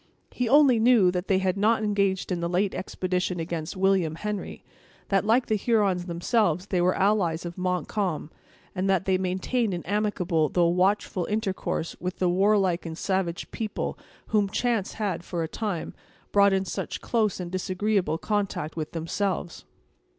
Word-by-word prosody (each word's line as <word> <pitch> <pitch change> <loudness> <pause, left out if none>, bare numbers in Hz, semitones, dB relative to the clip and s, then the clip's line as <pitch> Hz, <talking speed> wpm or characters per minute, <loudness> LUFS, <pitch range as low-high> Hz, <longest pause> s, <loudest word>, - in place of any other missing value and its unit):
He 250 -2 -1
only 275 -4 +6
knew 220 -6 +5
that 180 +1 -3
they 190 - +3
had 190 0 0
not 220 +2 +2
engaged 200 -3 0
in 180 - 0
the 170 0 -2
late 190 +3 +1
expedition 180 -1 -2
against 165 0 -4
William 185 -4 +2
Henry; 210 +3 -5 0.5
that, 195 0 +2
like 240 +3 +4
the - - -1
Hurons 200 -5 +1
themselves 180 0 +1
they 185 -3 0
were 180 +1 +3
allies 190 -5 +1
of 170 0 -6
Montcalm; 180 -2 -2 0.4
and 190 +1 -1
that 190 -1 +2
they 185 -1 +2
maintained 190 +4 -1
an 175 - -6
amicable, 180 -6 0
though 175 - +2
a - - +3
watchful 185 0 +1
intercourse 195 -5 -2
with 180 +1 -4
the 180 - +1
warlike 190 -1 +2
and 160 -1 -6
savage 185 -3 -2
people 215 -2 -3 0.3
whom 205 -2 +2
chance 230 -2 0
had, 190 -6 -2
for 170 -1 -3
a - - -2
time, 195 -2 -4 0.4
brought 200 0 +5
in 190 0 +1
such - - -4
close 215 -5 0
and 175 -1 -5
disagreeable 185 -1 0
contact 200 -5 -2
with 155 -2 -4
themselves. 170 +2 -3
190 Hz, 165 wpm, -26 LUFS, 175-210 Hz, 0.5 s, only